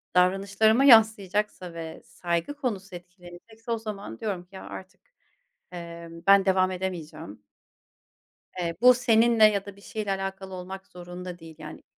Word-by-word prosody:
davranışlarıma 195 +6 +3
yansıyacaksa, 210 -6 +4
ve 165 -1 -8
saygı 170 +7 -3
konusu 210 -10 -4
etkilenecekse, 180 +6 -12
o 230 - +1
zaman 210 -2 -7
diyorum 200 -5 -3
ki: 185 - -18
Ya 190 - -9
artık, 190 0 -10 0.7
eee, 170 -1 -8 0.2
ben 195 -1 +6
devam 185 -1 +3
edemeyeceğim. 170 - -6 1.2
Eee, 170 -1 -2
bu 250 +1 +8
seninle, 235 -2 +4
ya 205 -2 +4
da, 200 -1 -10
bir - - -17
şeyle 210 0 -5
alakalı 195 0 -5
olmak 190 +1 -8
zorunda 180 0 -9
değil 165 -1 -12
yani. 155 0 -10
190 Hz, 140 wpm, -26 LUFS, 175-215 Hz, 1.2 s, bu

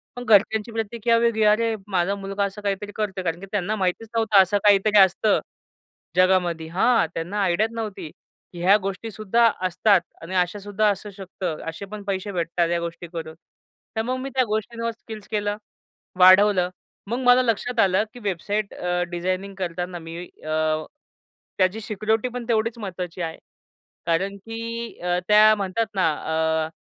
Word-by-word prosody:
पण 245 - -6
घरच्यांची 215 +1 +3
प्रतिक्रिया 230 +1 0
वेगळी. 230 -2 +2
अरे, 220 +2 +3
माझा 190 0 0
मुलगा 195 0 -3
असं 200 +1 -4
काहीतरी 205 0 -3
करतोय 195 -3 -3
कारण 165 0 -2
की 195 - -8
त्यांना 205 +1 -1
माहितीच 190 +2 -1
नव्हतं, 220 -3 +5
असं 190 +2 +2
काहीतरी 205 +1 +4
असतं 195 +2 +4 0.8
जगामध्ये. 180 -3 +2
हां, 195 +6 +3
त्यांना 180 +6 -3
आयडियाच 200 +5 +1
नव्हती. 215 -8 -5 0.4
ह्या 180 +4 +4
गोष्टीसुद्धा 215 +3 0 0.2
असतात 185 +2 +3 0.2
आणि 180 +3 -6
अशा 180 +3 +1
सुद्धा 205 +1 +1
असू 205 +1 -3
शकतं, 185 -4 -5
असे 165 +5 -7
पण 210 -1 -7
पैसे 195 +1 -2
भेटतात, 170 -1 0
ह्या 170 0 +1
गोष्टी 170 +1 -6
करून. 160 -1 -6 0.6
तर 220 - +1
मग 255 +3 -2
मी 270 +1 -5
त्या 255 - +4
गोष्टींवर 230 +2 -2
स्किल्स 220 -2 -11
केलं, 205 -1 -1 0.6
वाढवलं. 185 0 +6 0.4
मग 235 +4 -2
मला 245 +1 +7
लक्षात 240 0 -1
आलं, 190 0 +4
की 245 - -11
वेबसाईट 205 +2 -2
अ, 180 0 -2
डिझायनिंग 185 +3 -3
करताना 175 -1 -4
मी 165 0 -8 0.3
अ, 155 0 0 0.7
त्याची 190 +3 +2
सिक्युरिटी 220 +2 -1
पण 250 0 -6
तेवढीच 230 0 0
महत्त्वाची 180 -4 -6
आहे 165 -1 -4 0.7
कारण 185 +4 0
की 230 +2 -6
अ, 180 0 +1
त्या 215 +1 +7
म्हणतात 200 +2 -1
ना, 185 -3 +3
अ, 160 0 -1
200 Hz, 155 wpm, -23 LUFS, 180-220 Hz, 0.8 s, मला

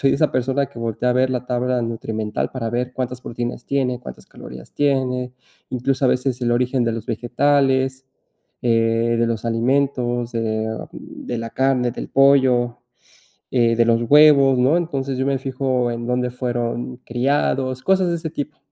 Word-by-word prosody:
soy 135 - +3
esa 150 +2 +1
persona 135 +2 0
que 120 - -13
voltea 115 +2 -1
a - - +3
ver 130 +1 +2
la 125 0 -3
tabla 125 0 0
nutrimental 110 -2 -3
para 120 -3 -4
ver 125 +2 -2
cuántas 125 -1 -4
proteínas 120 0 -5
tiene, 130 -3 -1
cuántas - - -10
calorías 65 +1 -12
tiene, 130 -3 0 0.4
incluso, 130 +2 -1
a - - +5
veces 125 0 0
el 120 - +1
origen 125 +1 +1
de 115 - +1
los 115 -1 -5
vegetales, 130 +2 +1 0.6
eh, 115 0 +2
de 115 - +3
los 115 -1 -3
alimentos, 120 0 0
eh, 110 -1 -1 0.2
de 120 - -7
la 115 0 -5
carne 130 -3 +1
del - - -7
pollo, 130 -3 +3 0.7
eh, 115 -2 +2
de 115 - +4
los 115 0 +3
huevos, 140 -3 +6
¿no? 130 +6 +4
Entonces, 140 -6 -2
yo 130 - 0
me 140 -1 +1
fijo 130 -2 -1
en 120 0 -4
dónde 125 0 -1
fueron 120 0 -3
criados, 130 0 0
cosas 190 -2 +2
de 170 - 0
ese 160 -1 -4
tipo. 150 -1 -6
125 Hz, 170 wpm, -21 LUFS, 120-135 Hz, 0.7 s, huevos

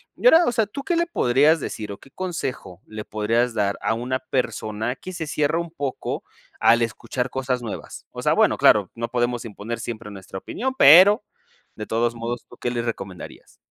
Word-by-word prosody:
Y - - -9
ahora, 340 -6 +7
o - - +2
sea, 225 -2 +2
¿tú 275 +7 -7
qué 345 - 0
le 340 0 +2
podrías 150 - +3
decir, 105 -5 -5
o 100 - -7
qué 135 - -18
consejo 135 - -5
le 110 0 -7
podrías 115 +4 0
dar 100 -2 0
a 110 - 0
una 130 +3 -2
persona, 115 -2 -2
que 185 - -9
se 165 -3 -5
cierra 150 +2 0
un 170 -1 -5
poco 140 -5 -4 0.4
al 120 +1 +5
escuchar 125 +3 -3
cosas 130 -1 -2
nuevas?, 115 - -7
o - - -7
sea, - - +2
bueno, - - +3
claro, 100 -3 +5
no 115 0 -4
podemos 120 -1 -1
imponer 115 +1 -6
siempre 110 -2 -6
nuestra 95 -1 -9
opinión, 260 - -3
pero, 190 - +8 0.5
de 105 - -6
todos 115 +1 0
modos, 120 +1 -5
¿tú 120 - -14
qué 120 - -2
les 120 -1 -2
recomendarías? 95 -6 -7
120 Hz, 195 wpm, -23 LUFS, 110-155 Hz, 0.5 s, pero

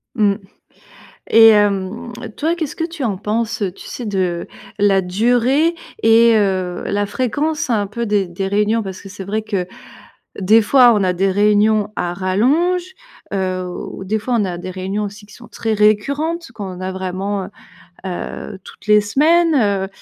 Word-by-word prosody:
Mmh 205 -4 +3 1.0
et 225 0 +9
hem, 205 +3 +1 0.2
toi, 325 +3 0
qu'est-ce 315 -5 -4
que 330 - -3
tu 330 -3 -5
en 210 -4 -1
penses, 215 +2 -2
tu - - -12
sais, 245 - -6
de 185 -4 -2 0.3
la 200 -1 +4
durée 245 - +2 0.3
et 230 +1 +6
heu, 190 -4 0
la 205 0 0
fréquence 285 +7 -2
un 210 -4 +1
peu 235 +3 -4
des 205 -3 +1
des 180 +3 -4
réunions, 210 +3 +1
parce 190 -2 -7
que - - -11
c'est 195 0 -8
vrai 210 +3 -2
que, 195 -4 -2 0.7
des 215 +4 +5
fois, 245 +2 +6
on 205 - +1
a 185 -1 +1
des 195 +2 +1
réunions 210 +1 +2
à 175 0 -1
rallonge, 265 - +1 0.5
heu 185 -1 -1
au 180 +1 -7
des 215 +3 0
fois, 240 +3 -2
on 205 - +1
a 180 -2 -4
des 185 +1 -6
réunions 190 +3 -3
aussi 205 +1 -7
qui 210 - -16
sont 240 - -14
très 225 -1 -2
récurrentes, 280 +11 +1
qu'on 190 -4 -7
a 185 0 -3
vraiment, 190 +2 -3
heu 185 - -8 0.6
heu, 190 +1 -6
toutes - - -15
les 210 0 +6
semaines, 270 - +2
210 Hz, 170 wpm, -18 LUFS, 190-235 Hz, 1.0 s, et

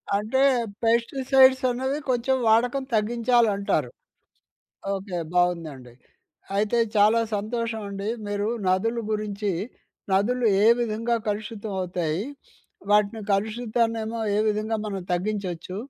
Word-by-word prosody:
అంటే 215 +6 0 0.4
పెస్టిసైడ్స్ 260 +3 +4
అన్నవి 265 +4 -2
కొంచెం 255 +2 +1
వాడకం 245 +5 +3
తగ్గించాలంటారు. 225 -2 +1 1.1
ఓకే. 195 -1 -5 0.2
బావుందండి. 165 -8 -1 0.6
అయితే 215 +3 +1 0.2
చాలా 215 +3 +5 0.2
సంతోషమండి, 215 -2 -4 0.2
మీరు 205 0 -2 0.2
నదుల 215 +6 +1
గురించి, 210 -1 -2 0.6
నదులు 235 +5 +2 0.2
ఏ - - +6
విధంగా 230 +1 0
కలుషితమవుతాయి? 195 -5 -3 0.7
వాటిని 210 +1 +3
కలుషితాన్నేమో 225 +2 -1 0.2
ఏ - - +2
విధంగా 215 +1 -1
మనం 195 -2 -4
తగ్గించొచ్చు, 185 -2 -3
215 Hz, 90 wpm, -25 LUFS, 200-235 Hz, 1.1 s, ఏ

